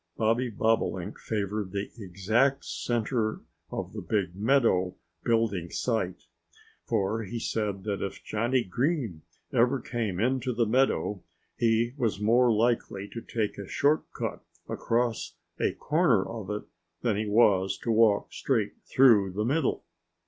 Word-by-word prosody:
Bobby 115 +3 +1
Bobolink 110 +1 0
favored 105 -2 -2
the 100 0 -3
exact 110 +7 +1
center 115 -2 -1 0.3
of - - -5
the - - -5
big 95 -5 -1
meadow 105 -5 +2 0.3
building 115 -7 +1
site, 100 -7 -2 0.6
for 105 +3 0
he 110 +3 -5
said 105 -4 -2
that 100 -2 -2
if 100 -1 -5
Johnnie 120 +4 0
Green 120 - -1 0.3
ever 125 +3 +3
came 115 -6 -3
into 125 +2 +1
the 115 0 +2
meadow 110 -4 +1 0.3
he 115 +1 +2
was 115 -6 0
more 120 +3 +4
likely 110 -3 0
to 115 - -7
take 110 -3 -3
a 100 - -6
short 150 +2 +1
cut - - -4 0.2
across 115 -1 -1 0.2
a - - +1
corner 150 - +2
of 110 -4 -6
it 105 0 -3 0.4
than 115 -4 +2
he 105 +1 -2
was 100 -3 +3
to 115 - 0
walk 110 -2 +3
straight 115 -7 -1
through 110 -8 +5
the 105 +3 -2
middle. 140 +3 0
110 Hz, 140 wpm, -28 LUFS, 100-120 Hz, 0.6 s, through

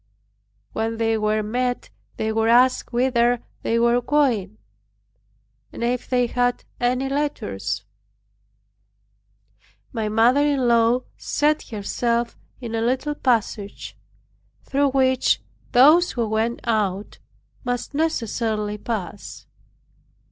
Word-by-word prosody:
When 225 +1 -2
they 225 0 +1
were 215 0 0
met 245 +3 -2 0.3
they 220 0 -1
were 225 0 +1
asked 250 +2 +4
whither 245 -1 +2 0.2
they 230 - 0
were 235 +1 +3
going, 245 - +1 1.1
and - - -6
if 245 +1 -1
they 250 -1 +2
had 245 0 0 0.2
any 250 +2 +1
letters. 100 - -2 2.1
My 220 -3 -2
mother 235 +6 +4
in 285 -4 +2
law 235 +1 +4 0.2
set 300 +1 0
herself 235 +2 -1 0.2
in 235 -3 -6
a 225 - 0
little 260 +5 0
passage, 225 -7 -1 0.7
through 280 +1 +1
which 260 -1 +2 0.3
those 305 +8 +6
who 235 -3 -1
went 220 +2 -1
out 205 -3 -1 0.4
must 245 +2 -3
necessarily 225 -8 -1
pass. 205 -4 -5
235 Hz, 105 wpm, -23 LUFS, 220-255 Hz, 2.1 s, those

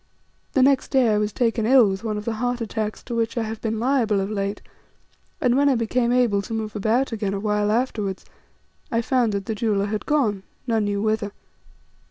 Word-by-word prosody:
The 265 - +4
next 275 0 +3
day 260 -4 +3
I 210 - +2
was 210 0 0
taken 225 -1 0
ill 255 -3 +6
with 195 +2 -4
one 215 -2 -2
of 210 - -6
the 230 - -1
heart 245 0 0
attacks 220 -2 -3
to 240 - -6
which 230 +1 -1
I 230 - +1
have 220 0 -5
been 220 -1 -2
liable 235 -5 +2
of 195 +2 -2
late, 200 -1 -2 0.8
and 250 -6 +2
when 285 +1 +4
I 270 - +3
became 235 +1 0
able 240 -5 +3
to 225 +3 -5
move 220 -1 -4
about 225 +6 +1
again 205 -3 -2
a - - -2
while 210 0 0
afterwards, 215 -5 -1 0.7
I 230 -1 +1
found 245 -3 +2
that 200 -1 -2
this 220 0 -3
jeweller 205 -3 +1
had 210 +1 -4
gone, 235 -10 +1 0.2
none 225 -4 +1
knew 205 0 -1
whither. 215 -2 -1
220 Hz, 215 wpm, -23 LUFS, 210-245 Hz, 0.8 s, ill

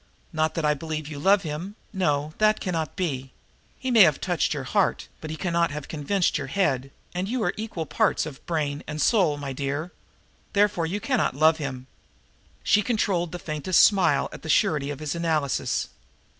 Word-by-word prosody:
Not 155 0 0
that 165 - -1
I 150 - +4
believe 155 0 -5
you 150 -2 -7
love 195 +5 +4
him 165 +6 -5 0.2
no, 150 -5 0
that 215 0 +4
cannot 165 -5 -3
be. 135 -8 -3 0.4
He 260 - -3
may 230 -3 +7
have 155 -7 +6
touched 175 -2 0
your 145 -3 -2
heart, 195 +9 0
but 155 - -6
he 160 - -5
cannot 170 +1 +1
have 145 0 -6
convinced 165 +3 0
your 145 - -4
head, 135 -6 0 0.2
and 180 +2 -2
you 245 -1 -1
are - - +1
equal 210 -7 -4
parts - - +1
of 150 -2 -9
brain 150 -4 -1
and 155 0 -5
soul, 170 -3 +3
my 140 -2 -5
dear. 145 +5 -3 0.6
Therefore 200 -5 +2
you 195 +5 -2
cannot 255 - 0
love 155 +2 +4
him." 130 -4 -5 0.8
She 210 - +4
controlled 195 -7 0
the 180 - -4
faintest 160 +2 0
of - - +10
smiles 190 -5 +1
at - - -10
the 160 - -8
surety 145 -2 +2
of 145 - -4
his 150 0 -3
analysis. 155 - -1
160 Hz, 190 wpm, -25 LUFS, 145-185 Hz, 0.8 s, of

